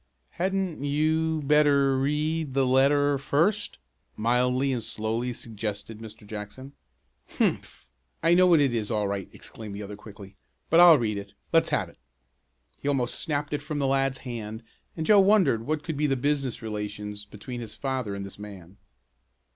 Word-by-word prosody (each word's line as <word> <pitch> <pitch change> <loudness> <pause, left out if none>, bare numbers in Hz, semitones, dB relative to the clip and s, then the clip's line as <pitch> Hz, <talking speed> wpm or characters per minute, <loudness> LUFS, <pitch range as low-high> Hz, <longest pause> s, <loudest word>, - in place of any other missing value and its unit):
"Hadn't 190 -4 -2
you 155 +2 +1
better 140 -2 +4
read 150 +1 -1
the 135 -1 +3
letter 140 +2 +3
first," 170 - 0 0.4
mildly 125 +4 +1
and 120 -3 -2
slowly 110 +4 -2
suggested 110 -2 -5
Mr. 110 0 -11
Jackson. 105 +6 -8 0.6
"Humph! - - -1 0.4
I 165 - +5
know 185 +1 +6
what 170 -3 +6
it 140 -4 +2
is 110 -3 -2
all 105 -3 0
right!" 100 -1 -4
exclaimed 105 -3 -9
the 105 - -6
other 100 +1 -7
quickly. 100 -2 -13 0.4
"But 165 - +6
I'll 175 -3 +9
read 105 -5 -1
it. 100 0 -11 0.2
Let's - - +4
have - - 0
it!" - - -19 0.8
He - - -4
almost 130 -4 0
snapped 145 -2 -2
it 145 - -1
from 150 0 -5
the 140 - 0
lad's 135 0 +1
hand 110 -2 -6 0.3
and 160 - -2
Joe 210 +2 +6
wondered 190 - +3
what 155 0 -1
could 160 -3 -4
be 150 +1 +1
the 135 - +1
business 135 -3 -1
relations 105 -1 -5
between 120 +4 -8
his 110 -3 -7
father 130 -7 -3
and 100 0 -5
this 100 - -11
man. 100 -3 -11
130 Hz, 170 wpm, -26 LUFS, 105-150 Hz, 0.8 s, I'll